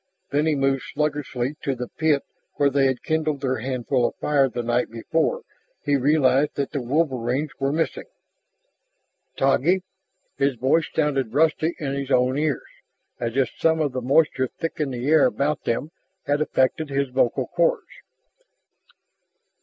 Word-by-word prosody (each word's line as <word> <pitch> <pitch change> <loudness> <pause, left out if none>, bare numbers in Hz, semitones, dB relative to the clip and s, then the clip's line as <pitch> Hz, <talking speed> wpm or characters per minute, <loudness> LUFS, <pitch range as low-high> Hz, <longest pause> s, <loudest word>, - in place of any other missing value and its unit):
When 150 +2 +1
he 155 - +2
moved 135 -1 +1
sluggishly 145 -2 -2
to 135 - -1
the 125 0 -5
pit 155 -1 +1 0.3
where 140 -2 +2
they 135 0 +3
had 130 -2 -2
kindled 155 -3 -1
their 130 -2 -1
handful 125 0 0
of - - -7
fire 140 -2 +2
the 120 0 -4
night 120 +1 0
before 160 - -1 0.4
he 145 - +2
realized 140 0 +3
that 140 -1 -2
the 140 - -2
wolverines 135 0 0
were 135 0 0
missing. 160 +2 -2 1.3
"Taggi 155 +7 +2 0.3
?" 185 - -47
His 140 -1 +2
voice 135 +7 +1
sounded 135 -6 0
rusty 160 +2 +2
in 140 -3 -3
his 140 -1 -4
own 125 -1 +3
ears, 150 -2 -1 0.5
as 115 +2 -3
if 135 - +2
some 160 0 +2
of 150 -3 0
the 130 0 -3
moisture 130 0 +2
thick 165 +6 -6
in 150 -2 0
the 125 0 -4
air 155 -1 +5
about 145 +1 -1
them 130 +7 -1 0.3
had 145 +1 +1
affected 150 +1 +1
his 140 -1 -1
vocal 125 -2 +1
cords. - - 0
140 Hz, 160 wpm, -23 LUFS, 130-155 Hz, 1.3 s, air